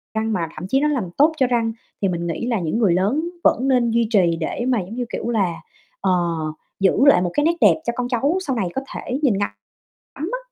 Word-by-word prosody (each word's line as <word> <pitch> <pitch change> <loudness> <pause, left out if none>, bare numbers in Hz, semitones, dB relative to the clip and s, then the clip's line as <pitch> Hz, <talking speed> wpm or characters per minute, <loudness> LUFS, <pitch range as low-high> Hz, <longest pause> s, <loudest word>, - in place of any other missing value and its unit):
răng, 220 0 0
mà 165 -4 -1
thậm 180 - -6
chí 265 +6 +2
nó 300 - +2
làm 245 -12 -1
tốt 305 +3 +5
cho 260 - +3
răng, 230 -2 +1 0.3
thì 195 - +2
mình 170 -1 -2
nghĩ 200 +9 -3
là 230 -5 0
những 170 +5 -1
người 195 -7 +3
lớn 255 - 0
vẫn 260 +4 +3
nên 245 -3 +2
duy 230 -1 +2
trì 170 -4 +3
để 240 +9 -3
mà, 245 -4 +2
giống 185 +5 -8
như 245 -1 -2
kiểu 235 - -3
là, 195 -7 +1 0.5
ờ, 190 -1 +2 0.7
giữ 190 -1 +4
lại 280 -10 +6
một 175 -1 -1
cái 295 - +1
nét 340 +1 +3
đẹp 315 - +5
cho 235 - -1
con 250 -1 -2
cháu 280 +8 +1
sau 265 - 0
này 195 -6 -1
có 265 - -1
thể 255 +3 -3
nhìn 225 -8 +3
ngắm 205 - 0 0.7
ngắm 315 +6 -4
á. - - 0
235 Hz, 250 wpm, -21 LUFS, 190-265 Hz, 0.7 s, lại